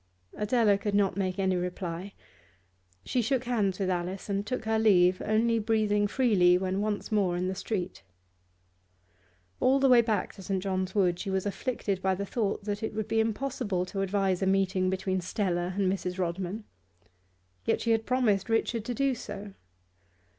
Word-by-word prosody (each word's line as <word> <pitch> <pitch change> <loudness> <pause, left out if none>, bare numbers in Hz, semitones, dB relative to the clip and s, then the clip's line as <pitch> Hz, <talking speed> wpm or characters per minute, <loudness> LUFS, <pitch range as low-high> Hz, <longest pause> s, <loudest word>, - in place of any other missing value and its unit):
Adela 210 -2 +2
could 200 0 -2
not 200 -2 +2
make 185 -1 -1
any 190 -1 +1
reply; 180 +1 -4 0.9
she 250 - 0
shook 250 +2 0
hands 210 -7 0
with 190 -2 0
Alice 180 +3 -3
and 200 +1 -1
took 250 -1 -3
her 220 0 +1
leave, 185 -4 +4
only 225 +2 +2
breathing 210 -1 +1
freely 200 -8 +4
when 190 +1 -1
once 210 0 -2
more 190 -5 +1
in 180 +1 -1
the 190 - -1
street. 190 -1 -4 1.6
All 270 +2 +4
the 270 - +4
way 245 -2 +7
back 220 -2 -1
to 195 - -12
St. 190 0 -2
John's 190 -1 -2
Wood 180 -4 +2
she 195 - -4
was 190 0 -1
afflicted 205 -2 -2
by 190 0 +1
the 200 +2 -3
thought 205 -1 -2
that 205 0 -3
it 220 -1 -4
would 215 -1 -2
be 225 - +1
impossible 220 -4 -1
to 195 +1 -4
advise 195 -1 0
a 190 - +1
meeting 190 -1 +2
between 190 0 -1
Stella 180 -1 -1
and 200 - +1
Mrs. 185 -1 -2
Rodman. 185 +4 -3 1.0
Yet - - +1
she 230 - +1
had 225 0 +1
promised 235 -6 +1
Richard 225 0 0
to 245 0 -3
do 275 +1 +1
so. 205 -4 -7
200 Hz, 175 wpm, -28 LUFS, 185-220 Hz, 1.6 s, way